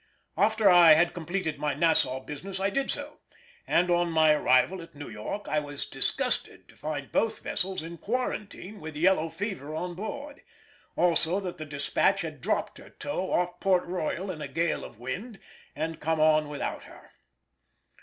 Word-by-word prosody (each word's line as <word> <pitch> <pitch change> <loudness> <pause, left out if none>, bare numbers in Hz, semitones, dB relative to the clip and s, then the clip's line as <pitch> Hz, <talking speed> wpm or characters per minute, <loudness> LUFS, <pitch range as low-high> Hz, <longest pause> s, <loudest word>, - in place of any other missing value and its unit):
After 215 0 +3
I 175 -3 +9
had 170 +3 +3
completed 170 -1 -3
my 150 -1 -1
Nassau 145 -5 +2
business 185 +8 -6
I 195 +1 0
did 275 +3 -1
so, 290 +1 +2 0.5
and 180 +1 +3
on 175 0 +2
my 160 -1 +5
arrival 150 +5 +3
at 165 -1 -13
New 145 0 -8
York 110 - -5
I 155 - +1
was 145 -1 -4
disgusted - - 0
to - - -17
find 145 -3 -5
both 225 0 0
vessels 185 -3 -1
in 165 0 -8
quarantine 210 -3 -4
with 155 0 -7
yellow 165 0 +3
fever 175 -7 -5
on 180 +2 -3
board; 280 - -7 0.5
also 175 +1 +2
that 180 -4 -6
the 155 - -6
Despatch 140 -1 +1
had - - -6
dropped - - -1
her - - -13
tow 190 -10 -4
off 175 0 0
Port 185 -2 +2
Royal 180 +2 -3
in 155 -4 -8
a 145 - -4
gale 165 +5 -1
of - - -10
wind 195 - -6 0.4
and 160 +1 -3
come 160 +1 0
on 155 -1 +4
without 145 - -4
her. - - -15
170 Hz, 175 wpm, -28 LUFS, 155-190 Hz, 0.5 s, I